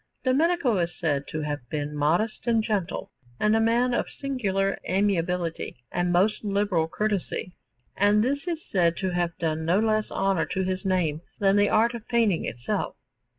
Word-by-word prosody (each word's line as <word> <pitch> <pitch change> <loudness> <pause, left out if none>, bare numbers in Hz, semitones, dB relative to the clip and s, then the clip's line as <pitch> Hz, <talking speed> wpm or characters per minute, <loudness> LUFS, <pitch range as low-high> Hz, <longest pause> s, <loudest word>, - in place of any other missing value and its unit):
Domenico 270 - +2
is 170 0 -2
said 145 -5 -1
to 155 - -4
have 150 -1 -2
been 150 -1 -3
modest 170 +12 0
and 225 -2 +3
gentle, 205 -6 -2 0.3
and 210 +1 +3
a 225 - +3
man 240 +2 +2
of - - 0
singular 195 -8 -1
amiability 180 -3 0 0.2
and 175 0 0
most 190 +6 +2
liberal 200 -5 +1
courtesy; 195 -1 -2 0.4
and 205 +2 +4
this 280 +6 -1
is 340 -2 -1
said 170 -3 +2
to 190 -1 -1
have 175 -1 -1
done 160 -1 -1
no 170 +4 +2
less 215 -1 +1
honour 195 -4 0
to 190 0 -1
his 185 +1 -2
name 175 -5 0 0.2
than 195 -1 +3
the 205 0 +4
art 230 +2 +3
of 235 -2 -8
painting 225 -7 +2
itself. 125 - -3
195 Hz, 170 wpm, -26 LUFS, 170-220 Hz, 0.4 s, and